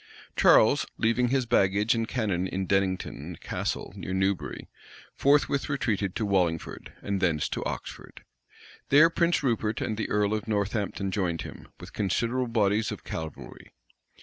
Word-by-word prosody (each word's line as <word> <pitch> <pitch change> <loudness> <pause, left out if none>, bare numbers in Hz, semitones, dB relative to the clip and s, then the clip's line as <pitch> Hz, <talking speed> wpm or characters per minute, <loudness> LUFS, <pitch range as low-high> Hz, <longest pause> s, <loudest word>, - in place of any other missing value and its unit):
Charles, - - +5
leaving 115 +2 +2
his 130 0 +1
baggage 105 0 +3
and 115 -1 -1
cannon 100 -8 -1
in 95 +1 -3
Dennington 95 -4 -1
Castle, - - -4
near 95 -1 -4
Newbury, 95 0 -1 0.5
forthwith 140 0 +2
retreated 105 -9 -1
to 110 - -1
Wallingford, 90 -5 -1
and 100 -1 -2
thence 80 -5 +1
to - - -3
Oxford. - - -7 0.7
There 155 +4 +7
Prince 170 -2 +1
Rupert 115 -4 0
and 110 - -2
the 110 - -3
earl 105 0 +1
of 110 0 -3
Northampton 100 -2 -1
joined 90 -4 -1
him, - - -10
with - - -11
considerable 120 +5 0
bodies 110 -2 +1
of - - -7
cavalry. 80 -2 -8
105 Hz, 145 wpm, -27 LUFS, 95-115 Hz, 0.7 s, There